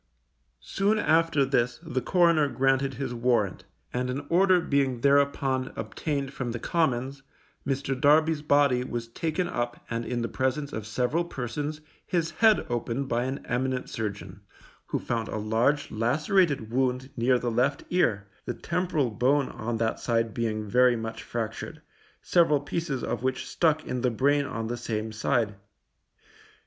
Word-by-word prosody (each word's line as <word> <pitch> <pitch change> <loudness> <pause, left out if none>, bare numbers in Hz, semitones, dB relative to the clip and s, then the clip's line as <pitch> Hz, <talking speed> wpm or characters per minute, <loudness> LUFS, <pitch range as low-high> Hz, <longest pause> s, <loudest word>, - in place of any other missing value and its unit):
Soon 205 +3 +1
after 160 -5 +3
this 125 -3 0
the 130 - -2
coroner 170 -4 +3
granted 135 +1 +1
his 130 -1 -3
warrant, 120 -5 0 0.3
and 125 +1 -1
an 140 +3 -3
order 185 +1 +5
being 135 -6 0
thereupon 140 -1 +2
obtained 135 +5 -3
from 120 -4 -3
the - - -2
Commons, 135 -3 0 0.5
Mr. 135 0 -1
Darby's 155 +1 +4
body 145 -4 +3
was 120 -2 -4
taken 165 +7 -2
up 120 -6 -3
and 115 0 -1
in 120 0 -2
the - - -1
presence 135 +4 -2
of 110 -1 -5
several 125 +9 0
persons, 145 +1 -4 0.2
his 170 -2 -1
head 220 -2 +4
opened 120 +3 -2
by 120 +1 0
an 135 +1 -4
eminent 130 +1 -2
surgeon, 100 -3 -5 0.5
who - - -1
found 115 -2 -2
a - - -4
large 115 +7 +1
lacerated 140 - +1
wound 130 +1 0
near 125 +1 +3
the 120 -1 -2
left 130 +5 +1
ear, 115 - +2 0.2
the - - -3
temporal 165 -7 -1
bone 130 +5 +2
on 120 0 -4
that 115 0 -1
side 115 -2 0
being 110 -2 -2
very 125 +3 +4
much 115 0 -5
fractured, 115 -1 -5 0.4
several 165 -5 +4
pieces 145 -2 -3
of - - -2
which 130 0 -1
stuck 155 -2 +1
in 125 - -3
the 125 - +2
brain 140 +5 +2
on 115 -4 -4
the 120 +2 -3
same 110 -2 -3
side. 110 0 0
130 Hz, 155 wpm, -27 LUFS, 120-145 Hz, 0.5 s, order